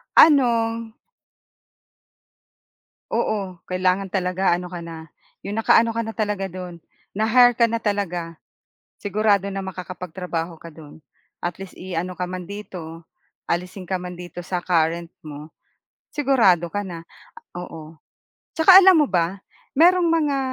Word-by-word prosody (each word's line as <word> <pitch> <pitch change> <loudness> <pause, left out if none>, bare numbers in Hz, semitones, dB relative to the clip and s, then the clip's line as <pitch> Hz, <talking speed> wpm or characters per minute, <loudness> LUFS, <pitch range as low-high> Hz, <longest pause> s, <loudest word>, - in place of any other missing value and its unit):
Ano. 230 -6 +4 2.2
Oo, 195 -5 -2
kailangan 185 +1 0
talaga 185 -1 +1
ano 180 - -6
ka 175 -1 -7
na 165 -1 -9 0.4
'yong 200 - -4
nakaano 230 +1 +4
ka 230 - -1
na 225 - -5
talaga 205 -3 -1
do'n 180 -2 -8 0.3
na-hire 245 +4 +5
ka 235 -1 +3
na 230 - 0
talaga 190 -6 -2 0.6
sigurado 205 -1 +1
na 195 - -3
makakapagtrabaho 180 -2 -5
ka 165 0 -12
do'n 150 -2 -13 0.4
at 175 - -3
least 195 - -10
iano 180 0 -4
ka 180 - -2
man 180 0 -7
dito 170 -5 -8 0.4
alisin 180 +2 -3
ka 185 0 -3
man 180 -1 -7
dito 175 0 -8
sa 180 0 -4
current 170 -1 0
mo 150 0 -10 0.6
sigurado 225 - +2
ka 205 - -1
na 175 -4 -7 0.5
oo, 165 -2 -9 0.6
saka 365 +4 +9
alam 380 -1 +7
mo - - -1
ba 180 +2 0 0.3
mayroong 350 +4 +5
mga 305 -4 +1
185 Hz, 130 wpm, -22 LUFS, 175-220 Hz, 2.2 s, saka